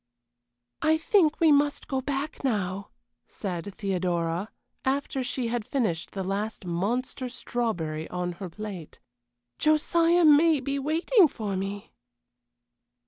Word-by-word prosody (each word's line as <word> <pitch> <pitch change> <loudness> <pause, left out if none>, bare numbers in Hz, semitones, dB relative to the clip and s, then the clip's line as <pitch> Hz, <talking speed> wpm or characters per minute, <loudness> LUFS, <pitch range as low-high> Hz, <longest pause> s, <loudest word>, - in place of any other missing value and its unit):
"I 315 0 +4
think 320 -1 +3
we 325 -2 +5
must 290 0 +2
go 265 -2 -1
back 285 +3 -3
now," 200 -6 -1 0.4
said 190 0 -5
Theodora, 180 -1 -1 0.3
after 275 0 -1
she 245 -1 -2
had 240 -1 -1
finished 210 -10 -1
the 195 - -3
last 200 +2 -3
monster 235 +9 -2
strawberry 180 -11 -3
on 180 0 -2
her 190 - -4
plate. 195 -4 -8 0.6
"Josiah 330 +3 +3
may 310 +1 +6
be 275 +1 -2
waiting 330 - +4
for 210 -8 -4
me." 195 +2 -5
235 Hz, 120 wpm, -27 LUFS, 190-290 Hz, 0.6 s, may